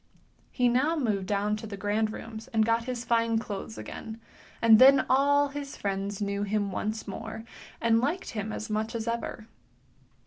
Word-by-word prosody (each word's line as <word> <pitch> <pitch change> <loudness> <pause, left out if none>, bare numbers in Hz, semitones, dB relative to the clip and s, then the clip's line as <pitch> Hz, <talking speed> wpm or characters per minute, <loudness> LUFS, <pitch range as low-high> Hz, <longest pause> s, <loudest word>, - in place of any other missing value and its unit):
He 250 - +2
now 260 +7 +2
moved 210 - -1
down 205 +1 0
to 220 - -7
the 200 -1 -7
grand 210 +2 0
rooms 225 +1 -8
and 220 -3 +2
got 230 +1 +1
his 250 -1 -4
fine 230 -1 +2
clothes 220 0 -5
again, 225 0 -7 0.4
and 225 -1 +7
then 270 +1 +7
all 285 +2 +4
his 280 0 -6
friends 195 0 -3
knew 200 -1 -2
him 205 -1 -1
once 215 +4 -3
more, 220 +2 -6 0.4
and 230 0 +3
liked 310 +9 -2
him 215 -1 -4
as 215 - -5
much 220 +1 -2
as 225 0 -3
ever. 230 -1 -3
225 Hz, 175 wpm, -28 LUFS, 210-240 Hz, 0.4 s, and